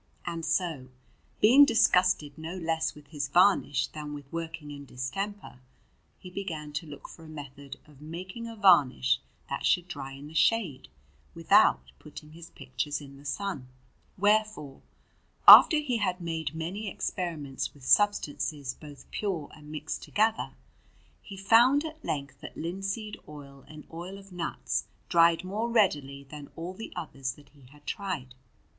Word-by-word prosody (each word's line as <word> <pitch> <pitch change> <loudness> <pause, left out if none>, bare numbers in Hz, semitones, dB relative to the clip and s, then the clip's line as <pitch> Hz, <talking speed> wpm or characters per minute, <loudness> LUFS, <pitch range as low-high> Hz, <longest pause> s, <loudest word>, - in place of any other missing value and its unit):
And 170 -1 -4
so, 165 -5 -1 0.5
being 255 +7 +8
disgusted 180 - +3
no 160 +3 -7
less 165 -2 -1
with 145 -1 -16
his 145 -3 -3
varnish 175 0 +3
than 150 -1 -7
with 145 -1 -9
working 160 -2 -5
in 140 -1 -8
distemper, 140 +7 -5 0.6
he 180 - -12
began 160 -6 -5
to 150 +2 -4
look 145 -1 -10
for 165 - -13
a - - -12
method 140 -2 -9
of 150 -2 -19
making 185 +9 -7
a 230 - -8
varnish 140 - +4 0.3
that - - -4
should 180 0 +2
dry 135 -5 -7
in 135 +1 -10
the 155 - -12
shade, 160 - +1 0.5
without 65 0 +4
putting 150 0 -12
his 165 +1 -12
pictures 135 +3 -4
in 140 -2 -12
the 140 - -16
sun. 145 -3 -4 0.5
Wherefore, 205 -8 +1 0.7
after 315 - +11
he 280 -6 0
had 185 -4 -1
made 160 -3 -4
many 190 +6 -4
experiments 160 -9 -4
with 135 -3 -14
substances 150 -7 +1
both 145 -2 -13
pure 180 -8 -3
and 150 -1 -13
mixed 155 0 -5
together, 220 +1 0 0.7
he 195 - -10
found 240 +9 +5
at 315 0 -8
length 140 -2 -4
that - - -10
linseed 195 +5 -4
oil 140 -2 -12
and 155 -1 -12
oil 175 +4 -7
of 195 0 -15
nuts 175 -2 -3 0.2
dried 170 -1 +4
more 210 +5 -2
readily 145 - +1
than 145 +1 -10
all 170 +3 -6
the 220 +4 -8
others 135 -7 -4
that 145 0 -19
he 140 -3 -20
had 145 +1 -20
tried. 180 -11 -4
160 Hz, 155 wpm, -28 LUFS, 145-195 Hz, 0.7 s, after